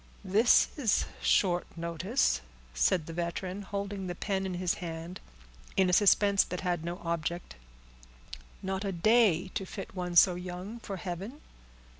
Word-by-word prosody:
"This 210 Hz, +6 st, +5 dB
is 235 Hz, -9 st, +2 dB, 0.2 s
short 175 Hz, -3 st, +2 dB
notice," 170 Hz, -, 0 dB, 0.3 s
said -, -, +2 dB
the 165 Hz, -, -7 dB
veteran, 175 Hz, +3 st, -3 dB
holding 200 Hz, -1 st, -4 dB
the 175 Hz, -, -4 dB
pen 195 Hz, 0 st, -2 dB
in 185 Hz, -, -4 dB
his 180 Hz, -1 st, 0 dB
hand, 165 Hz, +1 st, -6 dB, 0.6 s
in 185 Hz, -1 st, +4 dB
a -, -, -2 dB
suspense 200 Hz, +1 st, +5 dB
that 180 Hz, -, -5 dB
had 175 Hz, -3 st, -1 dB
no 175 Hz, +2 st, -4 dB
object; 170 Hz, +1 st, -3 dB, 1.1 s
"not 190 Hz, +1 st, -2 dB
a 200 Hz, -, -1 dB
day 190 Hz, -1 st, +3 dB
to 195 Hz, -, -3 dB
fit 195 Hz, +1 st, -8 dB
one 180 Hz, -2 st, -4 dB
so 180 Hz, +2 st, +7 dB
young 180 Hz, +5 st, -6 dB
for 200 Hz, -4 st, -6 dB
heaven?" 190 Hz, -, -6 dB
185 Hz, 150 wpm, -30 LUFS, 175-200 Hz, 1.1 s, so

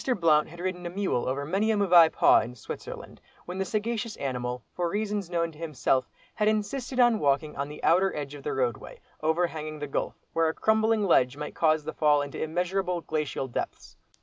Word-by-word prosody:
Blount 155 Hz, -3 st, +4 dB
had 170 Hz, +2 st, -12 dB
ridden 180 Hz, -1 st, -3 dB
a -, -, -4 dB
mule 185 Hz, -9 st, -1 dB
over 140 Hz, +2 st, -2 dB
many 195 Hz, +8 st, 0 dB
a 220 Hz, -, +2 dB
mauvais 175 Hz, -5 st, +7 dB
pas -, -, +5 dB
in 125 Hz, +2 st, -8 dB
Switzerland, 115 Hz, -, -8 dB, 0.2 s
when 180 Hz, +2 st, -6 dB
the 190 Hz, -, 0 dB
sagacious 225 Hz, +2 st, -2 dB
animal, 125 Hz, -2 st, -3 dB
for 175 Hz, -1 st, -1 dB
reasons 205 Hz, -1 st, -2 dB
known 170 Hz, -1 st, -1 dB
to 155 Hz, -, -17 dB
himself, 135 Hz, -5 st, 0 dB, 0.2 s
had 210 Hz, -2 st, 0 dB
insisted 220 Hz, +5 st, -1 dB
on 240 Hz, -3 st, +5 dB
walking 145 Hz, +2 st, +1 dB
on 140 Hz, +1 st, -3 dB
the 150 Hz, -, -10 dB
outer 190 Hz, +3 st, +4 dB
edge 145 Hz, -1 st, -5 dB
of 145 Hz, -, -9 dB
the -, -, -3 dB
roadway, 125 Hz, -4 st, -2 dB, 0.2 s
over 160 Hz, +3 st, +2 dB
hanging 155 Hz, -2 st, -6 dB
the 145 Hz, -, -4 dB
gulf, 140 Hz, -, -3 dB, 0.2 s
where 165 Hz, 0 st, +2 dB
a 160 Hz, -, -1 dB
crumbling 220 Hz, 0 st, +2 dB
ledge 135 Hz, -7 st, +3 dB
might 150 Hz, 0 st, -5 dB
cause 155 Hz, -2 st, +2 dB
the 155 Hz, -, -5 dB
fall 150 Hz, -1 st, +3 dB
into 145 Hz, -, -6 dB
immeasurable, 180 Hz, +2 st, -1 dB
glacial 150 Hz, -4 st, -2 dB
depths. 120 Hz, -, -5 dB
165 Hz, 200 wpm, -27 LUFS, 145-195 Hz, 0.2 s, mauvais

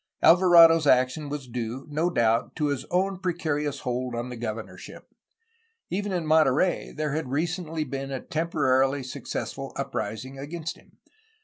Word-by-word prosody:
Alvarado 170 Hz, -2 st, +7 dB
's 155 Hz, -, -2 dB
action 130 Hz, +3 st, +2 dB
was 145 Hz, -3 st, -5 dB
due, 120 Hz, +2 st, -5 dB
no 155 Hz, +4 st, 0 dB
doubt, 115 Hz, -8 st, +1 dB
to 150 Hz, -2 st, 0 dB
his 135 Hz, -2 st, -2 dB
own 190 Hz, +1 st, 0 dB
precarious 155 Hz, -6 st, -2 dB
hold 125 Hz, 0 st, -3 dB
on 120 Hz, +1 st, -4 dB
the 125 Hz, -, -6 dB
governorship. 115 Hz, -1 st, -7 dB, 0.8 s
Even 205 Hz, +2 st, -2 dB
in 175 Hz, -3 st, -1 dB
Monterey 155 Hz, +2 st, +2 dB
there 150 Hz, -1 st, -3 dB
had 155 Hz, -4 st, -3 dB
recently 165 Hz, +2 st, -2 dB
been 135 Hz, -2 st, -5 dB
a 135 Hz, -1 st, -3 dB
temporarily 140 Hz, -4 st, +1 dB
successful 130 Hz, -, -5 dB
uprising 130 Hz, +5 st, -4 dB
against 160 Hz, +3 st, -5 dB
him. -, -, -23 dB
145 Hz, 145 wpm, -26 LUFS, 130-165 Hz, 0.8 s, Alvarado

